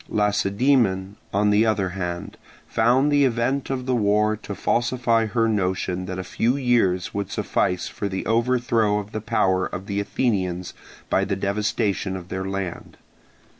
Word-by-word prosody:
Lacedaemon, 105 -1 +1 0.2
on 105 +1 +2
the 105 +2 +4
other 105 -4 +1
hand, 90 -2 -5 0.3
found 125 +6 +3
the 145 -1 +4
event 130 +2 0
of 130 -2 -2
the 130 - 0
war 105 -1 +2
to 105 -1 -7
falsify 120 -1 +1
her 115 +2 +1
notion 95 -3 -1
that 95 -1 -4
a 95 - -3
few 120 +7 0
years 115 -9 +1
would 100 0 -3
suffice 90 -1 -1
for 100 - -4
the 95 0 -4
overthrow 115 -2 +2
of 105 0 -5
the 110 - -4
power 95 -5 +1
of 95 - -6
the 100 0 -2
Athenians 95 -5 -1 0.4
by - - +3
the 100 - -1
devastation 100 -1 -1
of 90 0 -10
their 95 0 -3
land. 95 -3 -5
105 Hz, 160 wpm, -23 LUFS, 95-115 Hz, 0.4 s, the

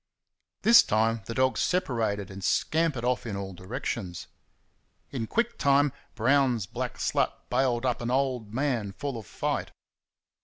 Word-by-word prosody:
This 235 +2 +9
time 110 +1 +1
the 115 - -5
dogs 130 +1 +2
separated 110 - 0
and 95 0 -8
scampered 155 - +1
off 125 0 0
in 105 - -3
all 95 -1 -5
directions. 90 -1 -5 0.9
In 115 -5 -3
quick 235 - -1
time 140 0 +4 0.2
Brown's 125 -2 +2
black - - -5
slut - - +1 0.2
bailed 125 -1 +1
up 125 -2 0
an 120 - -2
"old 125 -4 0
man" 120 -5 -1
full 140 +4 -4
of 110 -4 -7
fight. - - -2
120 Hz, 145 wpm, -28 LUFS, 105-135 Hz, 0.9 s, This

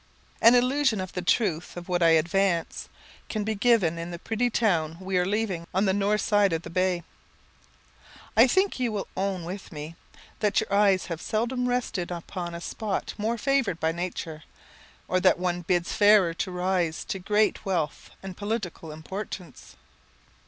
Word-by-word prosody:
An 230 +2 +8
illustration 250 -2 +2
of 185 -1 -5
the 180 - -3
truth 175 -3 0
of 175 - -7
what 175 -1 0
I 165 - +6
advance, 170 +1 0 0.4
can 215 -2 -2
be 220 +1 -1
given 200 -7 +2
in 170 +1 -5
the 170 - -6
pretty 225 +7 -1
town 170 -9 +1
we 190 0 -4
are 180 - +1
leaving 195 -5 -1
on 195 +2 +3
the 190 - +2
north 205 +2 +1
side 205 -4 +3
of 165 0 -2
the - - -8
bay. 185 -1 0 1.3
I 230 +4 +7
think 380 +4 +1
you 245 -3 0
will 205 -2 -3
own 190 -3 -2
with 185 +3 -7
me 155 +1 -7 0.4
that 210 -2 +2
your 220 - -3
eyes 200 -2 +4
have 165 -1 -5
seldom 245 +3 -1
rested 235 -8 -1
upon 175 0 -5
a 170 - -7
spot 210 +2 -3
more 225 +3 0
favoured 255 - +1
by 160 - +1
Nature, 165 -2 -5 0.7
or 185 - +1
one 180 0 +2
that 175 - -10
bids 175 -2 +1
fairer 205 -5 +5
to 175 +3 -3
rise 180 -2 -1
to 195 - -4
great 210 +3 +1
wealth 175 -7 -2
and 190 -1 -7
political 205 -6 -4
importance. 180 - -8
190 Hz, 175 wpm, -26 LUFS, 175-215 Hz, 1.3 s, An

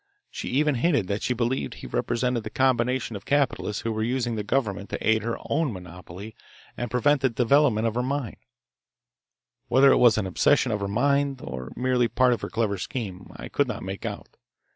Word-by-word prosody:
She - - -6
even 150 +3 +2
hinted 145 - +2
that 100 +1 -1
she 125 - -1
believed 120 +2 -1
he - - -10
represented 120 0 -1
the 110 - -5
combination 125 -1 +1
of 100 - -7
capitalists 125 -7 0
who 115 - -1
were 110 - -2
using 120 +1 -1
the 110 - -2
government 105 -3 -1
to - - -4
aid 110 0 +4
their 115 +2 -3
own 150 -2 +1
monopoly 90 +2 -9 0.4
and 120 -1 -4
prevent 135 +4 +2
the 135 - +3
development 125 -1 +3
of 115 - 0
her 125 - 0
mine. 130 -2 -3 1.3
Whether 135 +2 +6
it - - +5
was 120 -3 +5
an 105 - 0
obsession 125 +7 +2
of 105 - -1
her 100 - -2
mind, 140 +5 +1
or 65 -1 -6
merely 125 -1 +1
part 125 +1 +3
of 115 - -4
her - - -4
clever 105 -4 -1
scheme, 95 -4 -5
I - - -8
could - - 0
not - - -5
make 95 +1 -6
out. - - -7
120 Hz, 200 wpm, -25 LUFS, 105-130 Hz, 1.3 s, Whether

